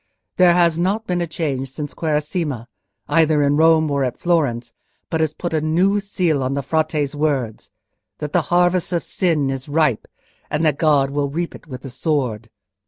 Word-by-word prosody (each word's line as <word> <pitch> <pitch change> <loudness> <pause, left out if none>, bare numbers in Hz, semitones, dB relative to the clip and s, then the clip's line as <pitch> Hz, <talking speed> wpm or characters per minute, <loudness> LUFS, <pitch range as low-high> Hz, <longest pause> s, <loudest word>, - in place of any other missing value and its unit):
There 180 -2 +6
has 170 -2 +3
not 200 +5 0
been 180 -2 -1
a 170 - -1
change 140 -5 -3
since 145 +2 -6
the - - -17
Quaresima, 150 -5 -2 0.4
either 155 -3 +3
in 140 0 +2
Rome 160 -1 +4
or 140 -1 +1
at 125 -2 -2
Florence, 125 -9 0 0.4
but 160 - 0
has 155 -1 0
put 175 -2 -4
a 155 - +1
new 180 +6 +2
seal 180 -7 0
on 130 +1 -1
the 140 - -2
Frate's 155 -1 0
words—that 145 +1 -4
the 175 - +4
harvest 175 0 +2
of 170 - -1
sin 155 -7 0
is 135 +1 -5
ripe, 145 -6 +1 0.4
and 155 +2 0
that 150 -3 +1
God 145 -4 +3
will 140 0 -1
reap 170 +4 -3
it - - -13
with 130 -1 -9
a 135 - -7
sword." 125 -6 -2
155 Hz, 185 wpm, -20 LUFS, 140-170 Hz, 0.4 s, There